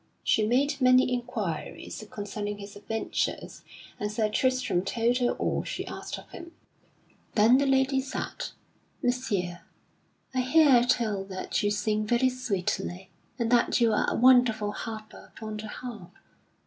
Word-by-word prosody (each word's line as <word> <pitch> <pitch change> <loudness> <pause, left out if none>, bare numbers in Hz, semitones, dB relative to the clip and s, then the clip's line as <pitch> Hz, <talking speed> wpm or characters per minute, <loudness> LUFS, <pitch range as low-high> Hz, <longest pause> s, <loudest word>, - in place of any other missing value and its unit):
She 215 -1 +2
made 280 +4 +1
many 255 0 +5
inquiries 220 -7 -4
concerning 205 0 -5
his 200 0 -10
adventures, 215 +2 -3 0.4
and 210 0 -2
Sir 215 0 0
Tristram 255 -5 +1
told 235 +4 +1
her 245 -1 +2
all - - -1
she - - -4
asked - - -6
of - - -12
him. 340 0 -10 0.8
Then 230 +5 +6
the 280 - +2
lady 265 0 +3
said: 265 0 -5 0.6
"Messire, 205 -9 -1 0.7
I 255 - 0
hear 260 -2 +5
tell 215 -5 +1
that 190 -1 -3
you 205 - +1
sing 215 0 0
very 240 +3 +3
sweetly, 190 -6 -3 0.3
and 235 -2 -1
that 245 +1 +3
you 230 -2 +4
are - - +2
a - - -1
wonderful 240 -4 +5
harper 215 0 -8
upon 215 -1 -6
the 215 +1 -6
harp. 215 -5 -8
230 Hz, 145 wpm, -28 LUFS, 210-255 Hz, 0.8 s, Then